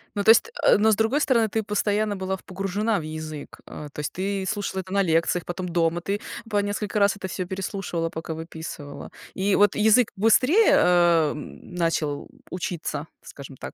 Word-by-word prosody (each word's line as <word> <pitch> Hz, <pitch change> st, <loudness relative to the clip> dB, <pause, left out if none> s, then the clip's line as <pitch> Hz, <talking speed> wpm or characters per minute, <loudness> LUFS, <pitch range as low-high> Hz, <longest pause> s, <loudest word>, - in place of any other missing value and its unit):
Ну 205 Hz, -, 0 dB
то 220 Hz, -, +3 dB
есть, 345 Hz, -, +6 dB
а, -, -, +5 dB
но, 220 Hz, +2 st, +4 dB
с -, -, +4 dB
другой 225 Hz, +8 st, +1 dB
стороны, 230 Hz, -6 st, +2 dB
ты 220 Hz, +1 st, -1 dB
постоянно 210 Hz, 0 st, 0 dB
была 190 Hz, 0 st, -3 dB
погружена 195 Hz, +3 st, -1 dB
в -, -, -5 dB
язык. 155 Hz, -1 st, -7 dB
А, 150 Hz, -, -9 dB
то 145 Hz, -, -11 dB
есть, 150 Hz, -, -3 dB
ты 195 Hz, +1 st, -2 dB
слушала 200 Hz, -2 st, -2 dB
это 185 Hz, +1 st, -10 dB
на 200 Hz, -, +3 dB
лекциях, 165 Hz, -1 st, +1 dB
потом 180 Hz, +1 st, -4 dB
дома, 170 Hz, 0 st, 0 dB
ты 200 Hz, +3 st, -3 dB, 0.3 s
по 210 Hz, -, 0 dB
несколько 205 Hz, +1 st, -2 dB
раз 200 Hz, 0 st, +3 dB
это 190 Hz, -1 st, -6 dB
всё 185 Hz, 0 st, -4 dB
переслушивала, 190 Hz, -3 st, -3 dB
пока 160 Hz, 0 st, -6 dB
выписывала. 160 Hz, -3 st, -8 dB, 0.2 s
И 195 Hz, +1 st, +1 dB
вот 205 Hz, -1 st, +4 dB
язык 220 Hz, +2 st, +4 dB
быстрее, 255 Hz, -, +4 dB
а, 175 Hz, -3 st, +4 dB
м, 150 Hz, +4 st, -10 dB
начал, 160 Hz, -4 st, -1 dB
м, -, -, -23 dB
учиться, 165 Hz, -4 st, -4 dB
скажем 140 Hz, -1 st, -11 dB
так? -, -, -8 dB
190 Hz, 190 wpm, -24 LUFS, 165-205 Hz, 0.3 s, есть